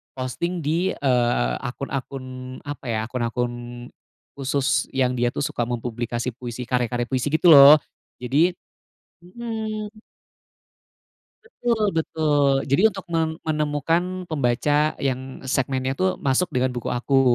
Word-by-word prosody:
posting 165 +7 -3
di, 165 +5 +1
eee, 120 - +1
akun-akun 135 +1 -5 0.4
apa 145 -2 -7
ya, 110 -2 0
akun-akun 120 0 -2 0.8
khusus 135 -1 0
yang 130 -1 +2
dia 120 - +2
tuh - - -1
suka 120 -4 -2
mempublikasi 120 0 -3
puisi, 120 +1 -7
karya 125 0 0
karya 120 0 -2
puisi 130 +2 -2
gitu 160 +3 +4
loh, 140 +1 +11 0.5
jadi 160 +8 +2 0.7
mhm. 215 +1 -5 1.5
Betul, 240 - -1
betul. 150 -3 +2
Jadi 140 +8 +3
untuk 195 0 -8
mem 160 -1 -1
menemukan 165 +4 -1
pembaca 145 +2 +1
yang 130 -1 -3
segmennya 130 0 0
tuh 185 0 0
masuk 140 +5 +1
dengan 130 -1 +1
buku 120 - -3
aku 135 +2 +2
140 Hz, 120 wpm, -23 LUFS, 125-165 Hz, 1.5 s, loh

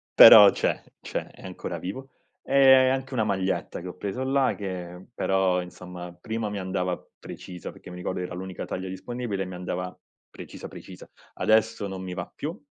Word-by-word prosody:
però - - +11
c'è, - - -1 0.2
c'è, - - -4
è - - -16
ancora - - -5
vivo. 130 +9 -6 0.3
E 130 -1 +6
anche 130 0 -2
una 110 -4 +1
maglietta 95 -3 -1
che 90 - -7
ho 90 - -9
preso 100 +7 -3
là 135 0 +2
che 90 -2 -6
però, 95 -4 +1
insomma, 90 0 -9
prima 110 +2 -3
mi 100 -1 -4
andava 90 -1 -2 0.2
precisa 90 -4 -8
perché - - -13
mi 90 - -8
ricordo 90 0 -3
era 90 - -5
l'unica 95 0 -6
taglia 95 +1 -5
disponibile 100 +1 -4
e - - -6
mi 90 0 -7
andava 90 0 -4 0.3
precisa, - - -9
precisa. - - -12 0.3
Adesso 110 -1 +2
non 95 -1 -6
mi 90 -1 -5
va 90 -1 -6
più, 160 +6 -5
95 Hz, 180 wpm, -26 LUFS, 90-115 Hz, 0.3 s, però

